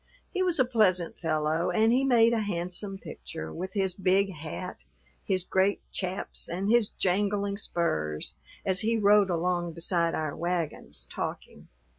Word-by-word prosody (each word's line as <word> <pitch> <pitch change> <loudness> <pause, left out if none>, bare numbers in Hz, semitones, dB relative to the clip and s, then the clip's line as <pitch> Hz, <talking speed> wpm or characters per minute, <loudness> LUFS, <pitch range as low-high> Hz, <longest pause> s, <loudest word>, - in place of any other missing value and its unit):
He 375 - 0
was 360 -2 +2
a 260 - +4
pleasant 190 -8 +2
fellow 155 +1 0
and 225 +1 +3
he 260 +2 +3
made 235 -3 +5
a 230 - +2
handsome 195 0 -3
picture, 80 - -7
with 185 +4 -5
his 190 -2 +1
big 195 +1 +2
hat, 160 +3 -7 0.4
his 185 -2 0
great 190 +2 +2
chaps 185 0 -4
and 185 +4 -2
his 230 -1 +4
jangling 200 +1 0
spurs, 75 - -1 0.3
as 190 0 +2
he 225 +1 +1
rode 205 -1 +5
along 175 0 0
beside 170 0 0
our 155 -2 -2
wagons, 165 - -3
talking. - - -5
185 Hz, 150 wpm, -28 LUFS, 170-205 Hz, 0.4 s, made